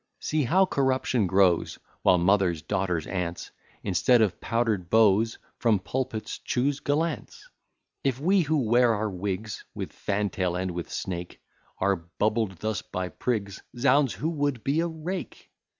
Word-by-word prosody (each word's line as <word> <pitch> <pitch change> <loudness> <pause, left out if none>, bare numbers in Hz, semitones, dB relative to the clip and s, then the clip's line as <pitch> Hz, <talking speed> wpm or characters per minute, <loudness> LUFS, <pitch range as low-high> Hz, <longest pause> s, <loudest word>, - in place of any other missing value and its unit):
See 155 -2 0
how 185 +10 +4
corruption 130 - +1
grows, 95 -2 +3 0.2
While 90 - +5
mothers, 90 -3 +2
daughters, 90 -3 -1
aunts, 90 -2 -4 0.3
Instead 110 +5 +3
of 100 - -1
powder'd 115 -7 0
beaux, 110 0 +5 0.3
From 115 -3 +3
pulpits 120 +2 -4
choose 135 +3 0
gallants. 150 +2 -2 0.6
If 135 -2 0
we, 185 +6 +3
who 155 -3 +1
wear 120 +1 +4
our 105 0 -2
wigs 100 +3 -4
With - - -5
fantail 100 -3 -1
and 90 0 -2
with 85 -1 -5
snake, 90 -1 -5 0.4
Are 100 +1 +2
bubbled 105 +5 -1
thus 110 -3 -1
by 90 0 -4
prigs; 100 -4 -3 0.2
Z 125 +3 0
ds! 135 -1 +4
who 160 +4 -2
would 145 -6 -1
be 140 +4 +1
a 170 - +1
rake? 170 +3 -6
110 Hz, 150 wpm, -27 LUFS, 95-135 Hz, 0.6 s, While